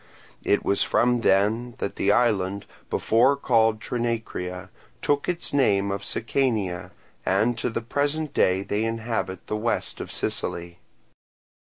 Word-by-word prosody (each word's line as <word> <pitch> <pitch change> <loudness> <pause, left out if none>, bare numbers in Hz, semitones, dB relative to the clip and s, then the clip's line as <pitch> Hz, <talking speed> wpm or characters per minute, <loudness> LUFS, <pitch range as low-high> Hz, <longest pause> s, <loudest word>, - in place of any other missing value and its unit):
It - - +1
was 100 - +2
from 120 0 +3
them 110 +5 +2
that - - -3
the 100 - +2
island, 100 -4 +1 0.2
before 120 +5 +3
called 115 -5 +2
Trinacria, 115 -7 -3 0.3
took 145 +2 0
its 175 -4 -2
name 100 -8 +3
of 100 0 -3
Sicania, 110 -8 -1 0.3
and 110 +6 +2
to - - -1
the 115 - -3
present 145 +5 -1
day 95 +1 +2
they 105 +2 -1
inhabit 115 -4 -3
the 105 - -2
west 115 +2 -2
of - - -7
Sicily. 85 0 -3
115 Hz, 135 wpm, -25 LUFS, 100-120 Hz, 0.3 s, from